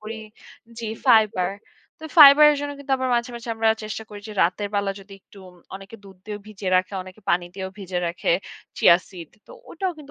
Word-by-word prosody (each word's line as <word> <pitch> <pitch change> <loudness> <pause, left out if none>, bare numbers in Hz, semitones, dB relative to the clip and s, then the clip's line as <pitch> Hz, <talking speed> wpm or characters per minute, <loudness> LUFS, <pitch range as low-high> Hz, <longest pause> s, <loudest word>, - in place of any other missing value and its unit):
করি। 215 +1 -7 0.6
জি, 230 - -5 0.2
ফাইবার। 215 -6 +3 0.5
তো 315 - -12
ফাইবারের 295 +1 +9
জন্য 290 0 -4
কিন্তু 280 -1 -5
আবার 260 - -2
মাঝে, 235 +1 -1
মাঝে 235 0 -10
আমরা 225 0 +1 0.2
চেষ্টা 215 +1 -6
করি 205 -1 -10
যে - - -7
রাতের 195 +4 -1
বেলা 200 -1 0
যদি 195 +1 -16
একটু 200 - -19
উম 180 - -18 0.2
অনেকে 195 +3 -11
দুধ 195 -1 -15
দিয়ে 210 -1 -6
ভিজিয়ে 195 -3 -5
রাখে, 185 +2 -1
অনেকে 185 +3 -14
পানি 175 0 +1
দিয়েও 190 -1 -6
ভিজে 185 -2 -4
রাখে 170 0 -1 0.4
'চিয়া 170 - +6
সিড'। 175 -5 -11 0.2
তো - - -14 0.2
ওটাও 365 +1 -3
কিন্তু 285 -1 -13
210 Hz, 200 wpm, -23 LUFS, 190-240 Hz, 0.6 s, ফাইবারের